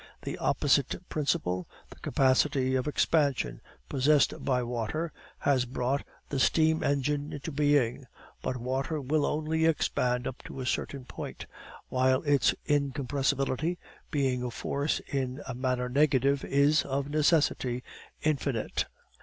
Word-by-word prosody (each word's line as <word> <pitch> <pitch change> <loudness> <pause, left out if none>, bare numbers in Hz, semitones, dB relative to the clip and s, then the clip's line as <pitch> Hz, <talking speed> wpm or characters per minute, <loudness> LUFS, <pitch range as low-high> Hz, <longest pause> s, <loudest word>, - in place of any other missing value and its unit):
The - - -4
opposite 145 +5 +1
principle, 90 - -1 0.2
the - - -13
capacity 130 0 +2
of 130 +1 0
expansion 140 - +1 0.3
possessed 140 +1 +3
by 125 -2 +1
water, 120 +8 -2 0.3
has 130 -3 +2
brought 130 +2 -1 0.3
the 140 - -1
steam 160 +3 +3
engine 145 +1 0
into 145 +3 -5
being. 140 -3 +2 0.3
But 125 - -2
water 130 +5 -2
will 145 +2 +1
only 155 +1 0
expand 125 -5 +1
up 130 - -5
to - - -8
a 130 - -3
certain 130 0 -2
point, - - -7 0.4
while 130 +2 +2
its 135 -10 +3
incompressibility, 140 +2 0 0.3
being 135 -5 0
a 125 - -2
force 140 +5 -1
in 130 -2 -3
a 130 - -3
manner 125 0 -1
negative, 140 0 +2
is, 145 +2 +4
of 140 0 -2
necessity, 145 -5 +2 0.4
infinite." 140 -6 0
140 Hz, 130 wpm, -29 LUFS, 125-145 Hz, 0.4 s, is